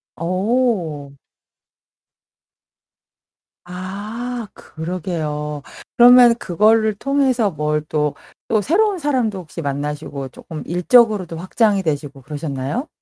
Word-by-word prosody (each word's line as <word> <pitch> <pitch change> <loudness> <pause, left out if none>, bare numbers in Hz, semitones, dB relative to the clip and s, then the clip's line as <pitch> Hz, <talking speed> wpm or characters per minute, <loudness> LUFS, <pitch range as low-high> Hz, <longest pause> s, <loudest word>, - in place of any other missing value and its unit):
어. 185 - -1 2.5
아. 185 +3 -7 0.4
그러게요. 155 -3 -4 0.4
그러면 245 0 +8
그거를 220 +2 +2
통해서 260 -2 +1
뭘 150 0 -1
또, 150 -1 0 0.3
또 215 - +2
새로운 385 - +1
사람도 250 - 0
혹시 170 -1 -8
만나시고 145 -1 -4
쪼끔 155 +4 -9
일적으로도 185 -1 +3
확장이 200 +3 +1
되시고 145 -4 -3
그러셨나요? 145 - -4
180 Hz, 220 characters per minute, -20 LUFS, 150-230 Hz, 2.5 s, 그러면